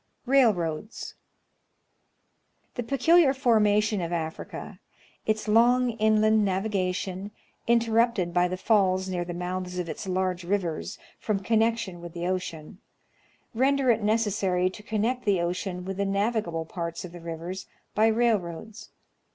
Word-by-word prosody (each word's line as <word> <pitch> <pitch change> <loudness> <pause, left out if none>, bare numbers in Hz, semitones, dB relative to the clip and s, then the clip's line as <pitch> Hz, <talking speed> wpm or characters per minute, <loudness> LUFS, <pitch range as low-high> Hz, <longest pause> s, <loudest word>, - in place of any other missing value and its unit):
Railroads. 215 - +1 1.6
The 245 - -3
peculiar 275 +4 +4
formation 215 -5 +3
of 170 0 -3
Africa, 160 -2 -5 0.5
its 215 0 0
long 240 +3 +4
inland 215 -1 +3
navigation, 190 -1 -1 0.4
interrupted 230 -5 +2
by 180 +1 +3
the 185 +1 -4
falls 190 -3 +2
near 180 -2 -2
the 175 0 -6
mouths 180 +1 -4
of 180 -1 -2
its 180 - -6
large 185 -1 -1
rivers, 175 -3 -2 0.2
from 210 -3 -1
connection 220 -3 0
with 170 -1 -9
the 175 0 -4
ocean, 180 -1 -4 0.7
render 265 +2 +3
it 225 -1 +1
necessary 205 -4 +1
to 200 - -11
connect 225 +4 -1
the 200 -4 +2
ocean 180 +1 -3
with 190 0 -4
the 200 - 0
navigable 195 -5 -1
parts 170 +1 -5
of 175 - -9
the 175 0 -10
rivers 170 +3 -6 0.3
by 220 +1 +4
railroads. 220 -2 -1
200 Hz, 130 wpm, -27 LUFS, 180-225 Hz, 1.6 s, peculiar